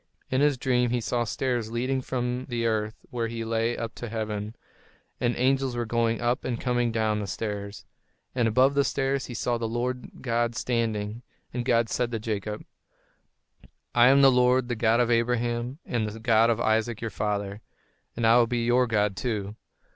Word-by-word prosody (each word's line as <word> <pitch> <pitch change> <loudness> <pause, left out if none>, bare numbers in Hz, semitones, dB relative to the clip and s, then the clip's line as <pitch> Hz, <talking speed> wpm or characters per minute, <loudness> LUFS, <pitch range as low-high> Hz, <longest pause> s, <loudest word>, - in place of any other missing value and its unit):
In 130 +1 +2
his 145 -2 +3
dream 125 -1 +1
he 120 +1 0
saw 120 +1 -1
stairs 120 -1 -1
leading 130 +3 -1
from 125 0 -2
the 120 -1 -1
earth 110 -1 0 0.2
where 115 -2 -1
he 115 0 -4
lay 115 +1 0
up 115 0 -4
to 120 - -7
heaven; 105 -1 -4 0.6
and 120 0 +1
angels 130 0 +1
were 120 0 -1
going 115 0 0
up 120 +1 0
and 120 -2 -2
coming 120 -1 0
down 110 -1 +1
upon - - -2
the 105 - -4
stairs. 100 0 -5 0.5
And 120 -3 +2
above 130 +5 +4
the 140 0 +3
stairs, 135 0 -1
he 120 - -7
saw 120 0 -1
the 115 - -1
Lord 125 +2 -4
God 120 -1 0
standing. 115 -2 -1 0.3
And 125 0 -2
God 120 -2 +2
said 120 +1 -1
to 115 - -1
Jacob: 105 -1 -4 1.3
"I 120 0 +6
am 140 +1 +6
the 135 - +8
Lord, 125 0 +3
the 120 - 0
God 115 +1 +2
of 120 -1 +2
Abraham, 120 +2 0
and 110 -3 -1
the 110 +2 -9
God 115 0 +4
of 115 -1 +1
Isaac 110 0 +1
your 115 -1 -4
father; 100 0 -2 0.5
and 115 - -1
I 115 +1 +6
will 120 -1 +4
be 120 0 -1
your 125 +1 +3
God, 105 -3 +1
too. 105 -3 -3
120 Hz, 190 wpm, -26 LUFS, 110-125 Hz, 1.3 s, the